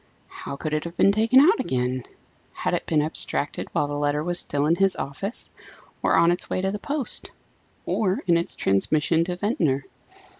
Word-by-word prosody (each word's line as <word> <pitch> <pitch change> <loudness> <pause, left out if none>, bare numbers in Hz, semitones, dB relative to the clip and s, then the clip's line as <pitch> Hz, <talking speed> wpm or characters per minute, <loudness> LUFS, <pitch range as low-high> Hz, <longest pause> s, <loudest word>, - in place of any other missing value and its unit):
How - - -8
could 155 +2 -5
it 155 - -1
have 170 +1 -8
been 195 - +5
taken 225 +5 +4
out 360 +11 +5
again? 130 -3 -1 0.5
Had - - -2
it - - -2
been 150 -2 +2
abstracted 150 -1 +2
while 150 -3 0
the 145 - -5
letter 145 +1 -1
was 175 +1 +1
still 145 0 -1
in 165 +3 +2
his 195 -1 +2
office? 195 - -6 0.5
or - - +2
on 170 +1 +4
its 175 - -3
way - - -1
to 190 +1 -1
the 210 - -5
post? 285 +2 0 0.6
or 190 -3 0
in 175 -3 +3
its 170 0 -1
transmission 155 - +1
to 180 0 -3
Ventnor? 165 - -1
170 Hz, 190 wpm, -24 LUFS, 145-195 Hz, 0.6 s, been